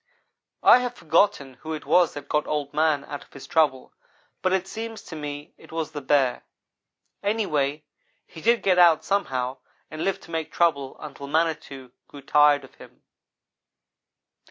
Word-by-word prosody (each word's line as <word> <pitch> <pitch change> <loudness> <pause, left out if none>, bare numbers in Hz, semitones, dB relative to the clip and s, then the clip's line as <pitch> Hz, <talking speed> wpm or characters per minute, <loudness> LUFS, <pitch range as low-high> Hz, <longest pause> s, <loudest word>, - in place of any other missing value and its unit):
"I - - +8
have 245 -1 -3
forgotten 155 -6 +1
who 160 0 -5
it 155 - -6
was 170 +3 +3
that 145 -1 -8
got 150 +1 0
Old 145 -2 -2
man 155 -2 +1
out 145 - -7
of - - -26
his 140 - -10
trouble, 145 -5 +1 0.5
but 185 - +1
it 190 0 0
seems 225 +1 -6
to 165 - -9
me 145 -1 -7
it - - -16
was 160 -1 -3
the 145 -1 -6
bear. 135 -2 +2 0.8
Anyhow 155 -9 0 0.4
he 160 - -12
did 235 +4 +2
get 185 -2 +3
out 170 -3 +6
some 200 0 +1
how, 130 0 -3 0.3
and 155 +1 -5
lived 195 -1 -1
to 170 - -13
make 160 -1 -3
trouble, 140 -6 0
until 140 -2 -9
Manitou 145 -4 -2 0.2
grew 140 -1 -12
tired 145 0 +4
of - - -15
him. - - -17
155 Hz, 170 wpm, -25 LUFS, 140-175 Hz, 0.8 s, I